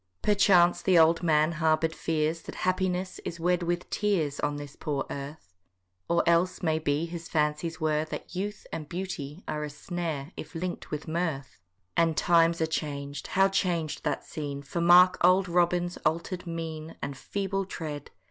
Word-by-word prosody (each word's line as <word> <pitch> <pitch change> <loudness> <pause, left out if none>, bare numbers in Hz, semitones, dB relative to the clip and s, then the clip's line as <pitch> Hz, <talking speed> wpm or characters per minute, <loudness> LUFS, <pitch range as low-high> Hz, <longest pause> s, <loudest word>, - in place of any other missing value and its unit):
Perchance 190 -4 +5
the 185 -2 +4
old 165 +1 +5
man 155 -2 +3
harbour'd 160 0 +1
fears 160 0 -1
That - - -9
happiness 185 0 0
is 170 - -5
wed 180 +1 +1
with 175 0 -2
tears 175 -9 0
On 145 0 0
this 145 -1 -8
poor 145 -3 -2
earth: 140 -8 -7 0.6
Or 170 0 +3
else, 170 +3 +2
may 160 -2 +2
be, 150 +1 0
his 170 -1 -7
fancies 155 +2 0
were 155 -1 +1
That 155 - -7
youth 205 +3 -4
and 155 -2 -5
beauty 175 -3 -5
are 150 0 -2
a 150 - -4
snare 160 -1 -4
If - - -9
link'd 175 +2 -4
with 150 +1 -5
mirth. 155 - -3 0.3
And 165 -2 +2
times 170 -1 +4
are - - +4
chang'd,—how 150 +4 -1
chang'd 175 -5 -1
that - - -2
scene, 140 -2 -5
For 170 +5 -3
mark 180 +2 +7
old 185 +2 +5
Robin's 175 0 +1
alter'd 175 +3 -2
mien, 165 -1 -5
And 140 0 -3
feeble 195 +6 -2
tread. 150 -6 -6
165 Hz, 165 wpm, -28 LUFS, 150-180 Hz, 0.6 s, mark